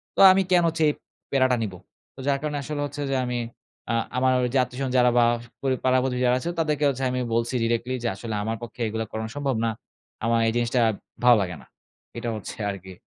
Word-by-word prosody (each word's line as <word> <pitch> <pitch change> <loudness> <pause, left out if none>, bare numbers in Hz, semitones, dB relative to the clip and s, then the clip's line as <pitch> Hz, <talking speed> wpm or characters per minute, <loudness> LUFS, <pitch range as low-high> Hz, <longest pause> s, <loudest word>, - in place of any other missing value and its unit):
তো - - -4
আমি 190 +1 +4
কেন 175 -1 +5
হচ্ছে 160 0 -1
এই - - 0 0.4
প্যারাটা 130 -2 +3
নিবো? 95 -4 -5 0.4
তো - - -15
যার 140 -1 +3
কারণে 150 -1 -2
আসলে 145 +1 -4
হচ্ছে 145 0 -6
যে - - +1
আমি 125 0 -2 0.5
আ - - +1 0.2
আমার 130 0 +3
ওই 125 - +1
যে - - +3
আত্বীয়স্বজন 125 +2 -4
যারা 125 0 +5
বা 120 - +6 0.4
পড়ি 135 -1 +1
পাড়া 130 0 +4
প্রতিবেশী 125 -1 -1
যারা 125 +1 +3
আছে 170 - -3
তাদেরকে 150 -2 0
হচ্ছে 135 -1 -3
আমি 125 - -1 0.2
বলছি 115 +2 0
directly 120 +2 0
যে, - - 0
"আসলে 110 +2 -5
আমার 115 +1 -2
পক্ষে 120 +1 -8
এগুলা 110 +1 -3
করানো 110 0 -4
সম্ভব 140 -3 -1
না। - - +2 0.6
আমার 115 0 +3
এই 115 - +1
জিনিসটা 120 +1 +1 0.4
ভালো 120 -2 +7
লাগে 90 -2 -3
না।" - - -17 0.5
এটা 120 - -3
হচ্ছে 110 - -7
আরকি। 95 -1 -7
125 Hz, 220 wpm, -25 LUFS, 115-135 Hz, 0.6 s, ভালো